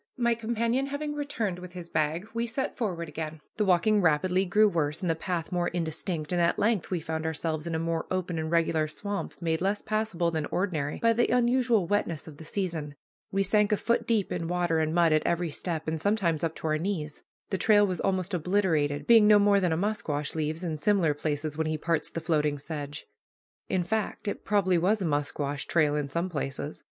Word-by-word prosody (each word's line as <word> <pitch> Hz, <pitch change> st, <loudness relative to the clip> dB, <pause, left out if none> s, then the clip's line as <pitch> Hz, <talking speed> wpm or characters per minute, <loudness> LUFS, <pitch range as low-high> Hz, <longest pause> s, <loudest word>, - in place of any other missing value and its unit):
My 235 Hz, -1 st, +3 dB
companion 235 Hz, +3 st, 0 dB
having 295 Hz, +1 st, -3 dB
returned 235 Hz, -11 st, -2 dB
with 180 Hz, 0 st, -10 dB
his 175 Hz, -2 st, -7 dB
bag, 160 Hz, +5 st, 0 dB
we 230 Hz, +1 st, -1 dB
set 250 Hz, +4 st, -2 dB
forward 180 Hz, -8 st, -2 dB
again. 155 Hz, +1 st, -5 dB, 0.2 s
The 210 Hz, -, +2 dB
walking 200 Hz, +3 st, +3 dB
rapidly 180 Hz, +3 st, +2 dB
grew 210 Hz, +4 st, +4 dB
worse 160 Hz, -4 st, -1 dB
and 185 Hz, -, -2 dB
the -, -, +2 dB
path 165 Hz, 0 st, -3 dB
more 175 Hz, -1 st, 0 dB
indistinct, 165 Hz, -1 st, -3 dB
and 175 Hz, -1 st, +1 dB
at 170 Hz, -, +2 dB
length 210 Hz, -4 st, +1 dB
we 180 Hz, -, -1 dB
found 160 Hz, 0 st, -4 dB
ourselves 160 Hz, 0 st, -2 dB
in 165 Hz, -, -2 dB
a -, -, +1 dB
more 165 Hz, 0 st, -2 dB
open 180 Hz, -3 st, -2 dB
and 160 Hz, 0 st, -3 dB
regular 165 Hz, -2 st, +2 dB
swamp 200 Hz, +6 st, -5 dB
made 160 Hz, 0 st, 0 dB
less 200 Hz, +2 st, 0 dB
passable 215 Hz, -6 st, 0 dB
than 155 Hz, -2 st, -2 dB
ordinary 160 Hz, -7 st, -1 dB
by 230 Hz, 0 st, +3 dB
the 240 Hz, +1 st, +2 dB
unusual 240 Hz, -4 st, +3 dB
wetness 170 Hz, -5 st, -1 dB
of 150 Hz, -3 st, -10 dB
the 160 Hz, -, -10 dB
season. 160 Hz, -5 st, -3 dB, 0.4 s
We 195 Hz, 0 st, +2 dB
sank 210 Hz, +1 st, +2 dB
a 210 Hz, -, +3 dB
foot 235 Hz, +3 st, 0 dB
deep 220 Hz, -4 st, +1 dB
in 170 Hz, -2 st, -2 dB
water 175 Hz, -2 st, +1 dB
and 155 Hz, 0 st, +1 dB
mud 170 Hz, -2 st, +4 dB
at 155 Hz, -, +3 dB
every 170 Hz, -1 st, 0 dB
step, 160 Hz, +1 st, -4 dB
and 160 Hz, -1 st, -1 dB
sometimes 185 Hz, -6 st, +1 dB
up 165 Hz, -1 st, -1 dB
to -, -, -9 dB
our 155 Hz, 0 st, +1 dB
knees. 160 Hz, -5 st, -3 dB, 0.3 s
The 190 Hz, -, 0 dB
trail 205 Hz, -1 st, +5 dB
was 185 Hz, -4 st, -2 dB
almost 190 Hz, 0 st, 0 dB
obliterated, 165 Hz, -5 st, +1 dB
being 225 Hz, -3 st, +7 dB
no 210 Hz, 0 st, +8 dB
more 205 Hz, 0 st, +4 dB
than 180 Hz, -3 st, +1 dB
a 160 Hz, -, +1 dB
musquash 165 Hz, -7 st, -2 dB
leaves 155 Hz, +2 st, -2 dB
in 160 Hz, -3 st, -2 dB
similar 180 Hz, -3 st, +3 dB
places 150 Hz, +1 st, -3 dB
when 160 Hz, -, +1 dB
he 155 Hz, 0 st, -1 dB
parts 165 Hz, +1 st, -1 dB
the 165 Hz, -, -5 dB
floating 150 Hz, -2 st, +1 dB
sedge. 145 Hz, 0 st, -6 dB, 0.6 s
In 185 Hz, -, +1 dB
fact, 220 Hz, +2 st, -2 dB
it 205 Hz, -, -4 dB
probably 190 Hz, -4 st, +2 dB
was 200 Hz, +6 st, +2 dB
a -, -, -1 dB
musquash 145 Hz, -1 st, -2 dB
trail 150 Hz, -3 st, +2 dB
in 145 Hz, -2 st, -2 dB
some 170 Hz, +5 st, -1 dB
places. 145 Hz, -3 st, -4 dB
175 Hz, 215 wpm, -28 LUFS, 155-205 Hz, 0.6 s, no